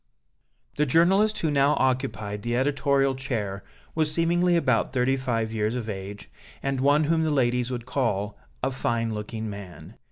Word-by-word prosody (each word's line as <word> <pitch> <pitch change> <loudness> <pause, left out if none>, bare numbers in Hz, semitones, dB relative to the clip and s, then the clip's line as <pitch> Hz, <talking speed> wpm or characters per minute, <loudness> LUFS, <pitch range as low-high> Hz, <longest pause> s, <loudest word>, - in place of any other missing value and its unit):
The 150 - +2
journalist 190 +9 +4
who 160 - 0
now 140 0 +3
occupied 110 -6 -1
the 120 +2 -1
editorial 140 0 +2
chair 115 -7 -3 0.3
was 155 -1 +1
seemingly 175 +2 +2
about 130 -5 +1
thirty 130 0 +2
five 115 -4 -2
years 110 +1 0
of 120 -3 -4
age, 100 0 -6 0.4
and 135 -1 -1
one 145 +3 +4
whom 160 +2 +2
the 160 - +1
ladies 125 -3 +1
would 120 -2 -4
call 105 -7 -1 0.3
"a - - +1
fine 115 -3 -1
looking 110 +1 -5
man." 100 -4 -9
130 Hz, 160 wpm, -26 LUFS, 110-145 Hz, 0.4 s, journalist